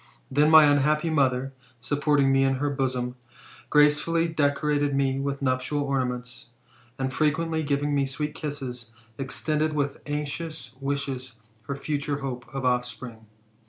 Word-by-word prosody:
Then 145 +3 +4
my 160 -1 +9
unhappy 150 +3 +3
mother, 135 -3 +1 0.3
supporting 145 +2 +2
me 135 0 +4
in 135 0 +2
her 145 +2 -1
bosom, 130 -2 -2 0.5
gracefully 150 +3 +4
decorated 145 -2 +1
me 135 -1 +1
with 140 0 -3
nuptial 130 +3 0
ornaments, 125 -3 -3 0.5
and 130 0 -2
frequently 160 +2 +1
giving 145 0 0
me 140 -1 +2
sweet 150 +2 -3
kisses, 130 -6 -5 0.3
extended 155 +3 -1
with 145 -1 -2
anxious 145 -3 -4
wishes 135 -3 -3 0.3
her 140 - -2
future 145 0 -2
hope 125 -3 -4
of 135 -1 -4
offspring. 125 -2 -2
140 Hz, 130 wpm, -26 LUFS, 130-150 Hz, 0.5 s, my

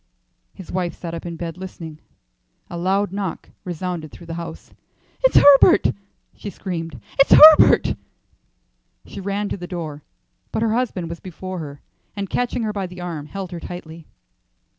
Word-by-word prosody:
His 190 -4 -10
wife 180 -2 -2
sat 170 -2 -7
up 170 +1 -6
in 170 - -5
bed 165 +1 -6
listening. 165 -4 -8 0.7
A 170 - -5
loud 195 +2 +1
knock 195 -3 -5
resounded 175 -3 -5
through 170 - -13
the 165 - -6
house. 170 0 -8 0.5
"It's - - +5
Herbert!" 285 +5 +7 0.4
she 205 - -7
screamed. 170 -5 -6 0.2
"It's 275 - +6
Herbert!" 310 0 +8 1.1
She 200 - -9
ran 200 +2 -2
to - - -3
the 175 -1 -7
door, 160 -5 -6 0.5
but 220 - -1
her 220 -1 +1
husband 225 -8 -1
was 170 +1 -7
before 185 0 -7
her, 145 -3 -8 0.3
and 200 -2 -5
catching 245 -1 -1
her 215 -1 -2
by 195 -2 -3
the 180 0 -11
arm, 165 -4 -5
held 190 +1 -6
her 175 - -6
tightly. 165 -2 -9
180 Hz, 160 wpm, -21 LUFS, 165-200 Hz, 1.1 s, Herbert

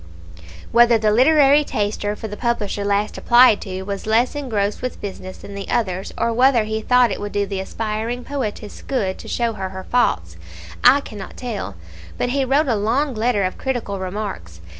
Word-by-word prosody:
Whether 235 0 +6
the 215 -1 +1
literary 285 +4 +5
taster 205 -4 -2
for 220 - -6
the 210 - -7
publisher 215 -4 -2
last 205 +1 0
applied 240 -3 +6
to 190 -1 -5
was 200 +1 -5
less 230 +3 +2
engrossed 220 -8 -2
with 255 -1 -4
business 185 -2 -7
than 200 - -11
the 200 -1 -7
others, 190 -5 -1
or 235 - 0
whether 250 -1 +4
he 220 +1 -3
thought 250 0 +4
it 195 - -4
would 205 0 -4
do 205 0 0
the 195 -1 -4
aspiring 225 +4 -3
poetess 225 -7 -5
good 200 -9 -2
to - - -10
show 235 -1 -1
her 190 -3 -5
her 190 0 -8
faults, 85 - 0 0.5
I 265 +3 +7
cannot 205 -7 -9
tell, 210 - -5 0.4
but 245 - -1
he 275 +2 +1
wrote 280 +4 +2
a 245 - +2
long 245 +7 0
letter 220 -2 +1
of 185 - -3
critical 240 -7 -3
remarks. 185 - -5
215 Hz, 185 wpm, -21 LUFS, 200-245 Hz, 0.5 s, I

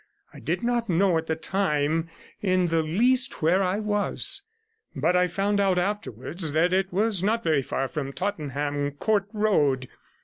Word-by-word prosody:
I - - -11
did - - -2
not 235 -2 0
know 180 -1 +3
at 160 - -8
the 160 - 0
time 160 -3 0 0.3
in 185 -3 +2
the 165 0 +2
least 245 - +2
where 175 +5 +3
I 185 +1 0
was, 210 - 0 0.5
but 180 - +1
I 180 0 +3
found 195 +4 0
out 195 -2 +2
afterwards 175 - -3
that 170 +3 +2
it 190 0 +1
was 205 0 +1
not 225 +4 0
very 155 -6 +2
far 135 +1 -2
from 140 -1 -4
Tottenham 145 -5 -2
Court 200 +6 0
Road. 150 - +1
180 Hz, 165 wpm, -25 LUFS, 155-205 Hz, 0.5 s, know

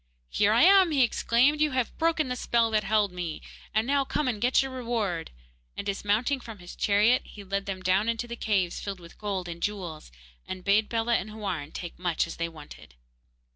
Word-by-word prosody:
'Here 205 0 +3
I 230 +3 +5
am!' 385 -1 +7
he 285 -4 +3
exclaimed. 250 +5 +2
'You 305 -3 +2
have 255 -2 -1
broken 325 -3 +2
the 250 - -2
spell 235 -2 +1
that 215 -1 +2
held 205 -1 +2
me, 175 -3 -5 0.3
and 220 +1 +1
now 280 +1 +2
come 280 +1 -1
and 220 -5 -2
get 250 +2 +3
your 270 - -5
reward,' 230 -9 -2 0.5
and, - - -4
dismounting 210 +7 0
from 225 -3 -9
his 175 -2 -11
chariot, 210 +4 +3
he 205 - -12
led 195 +1 -3
them 190 -1 -4
down 190 +4 +2
into 230 +1 -2
the 235 - -5
caves 195 -7 0
filled 195 -2 -5
with 170 -1 -15
gold 195 -4 -3
and 170 0 -7
jewels, 175 - -4 0.4
and 185 -1 -6
bade 210 +3 +3
Bellah 230 0 +1
and 195 - -5
Houarn 190 -9 -4
take 175 -2 -6
as - - -26
much 175 -3 0
as 170 - -8
they 170 0 -2
wanted. 150 - -13
210 Hz, 210 wpm, -27 LUFS, 185-240 Hz, 0.5 s, am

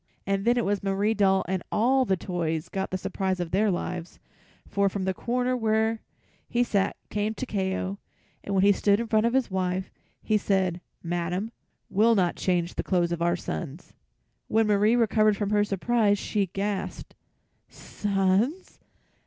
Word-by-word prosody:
And 195 0 -1
then 240 +1 +3
it 240 - +1
was 200 -1 0
Marie 200 +2 +1
Doll 195 -3 +2
and 185 0 -1
all 255 +4 +3
the 190 -4 +1
toys 165 -3 -3
got 190 0 -3
the 185 - -2
surprise 190 0 -2
of 175 -2 -3
their 205 +3 +2
lives, 180 -1 -4 0.5
for 200 0 +1
from 195 0 -4
the 190 0 0
corner 250 +5 -1
where 220 -1 +1 0.5
he 240 0 +2
sat 200 -5 0 0.2
came 210 +1 -1
Takeo, 195 -4 -2 0.4
and 200 - -3
when 190 - +3
he 200 - +6
stood 200 +1 +2
in 235 - -1
front 220 0 +2
of 235 - -1
his 265 -6 +1
wife, 185 0 -2 0.3
he 215 -1 +2
said, 185 -3 0 0.2
"Madam 175 +5 -2 0.4
will 225 +4 +3
not 180 -4 +1
change 175 -2 0
the - - -3
clothes 175 -2 +1
of 170 -1 -2
our 170 +1 +2
sons." 165 -2 -6 0.5
When 225 +1 +2
Marie 210 +2 +3
recovered 215 -3 +3
from 205 0 -2
her 205 0 +3
surprise, 205 +1 +1
she 200 -1 -1
gasped: 195 +1 -4 0.6
"Sons! 205 - -1
200 Hz, 170 wpm, -26 LUFS, 185-220 Hz, 0.6 s, he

